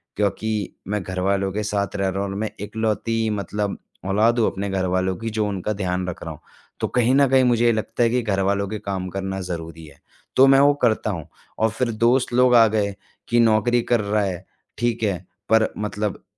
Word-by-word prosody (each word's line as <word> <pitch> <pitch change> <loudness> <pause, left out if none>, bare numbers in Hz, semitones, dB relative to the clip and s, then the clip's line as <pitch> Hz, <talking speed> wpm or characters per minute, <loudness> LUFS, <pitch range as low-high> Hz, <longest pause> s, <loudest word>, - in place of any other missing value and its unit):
क्योंकि 105 0 -1
मैं 105 +1 -1
घरवालों 95 +1 -1
के 105 +1 -2
साथ 100 -2 -2
रह 100 -1 0
रहा 95 +1 -2
हूँ 100 - -3
और 95 - -5
मैं 110 0 -1
इकलौती 110 +1 -1
मतलब 105 0 -2 0.3
औलाद 110 +5 +2
हूँ 115 - +3
अपने 100 +1 -4
घरवालों 95 -1 0
की, 115 0 -4
जो 110 -1 -1
उनका 100 +1 -2
ध्यान 90 -2 -2
रख 90 - -6
रहा - - -5
हूँ। - - -14 0.4
तो - - 0
कहीं 125 +1 +2
न 140 0 +5
कहीं 130 0 +5
मुझे 120 -1 +3
ये 120 - +5
लगता 110 +2 -1
है 115 - +4
कि 125 +2 +1
घरवालों 100 -2 0
के 105 +2 -5
काम 95 -3 -4
करना 95 +1 -4
ज़रूरी 85 -2 -6
है, 75 -2 -16 0.4
तो 135 +1 +7
मैं 135 0 +6
वो 145 +1 +6
करता 110 -2 +2
हूँ 85 -5 -6 0.3
और 110 - +3
फिर 115 +2 -1
दोस्त 120 +3 +2
लोग 125 0 +5
आ 115 -1 +7
गए, 105 -2 -1 0.3
कि 120 - +2
नौक़री 115 +2 +3
कर 120 0 +1
रहा 105 +1 0
है, 95 -2 -4 0.3
ठीक 120 -1 -1
है 100 -4 +1 0.3
पर 110 0 +4
मतलब 105 -1 -3
105 Hz, 215 wpm, -22 LUFS, 95-115 Hz, 0.4 s, तो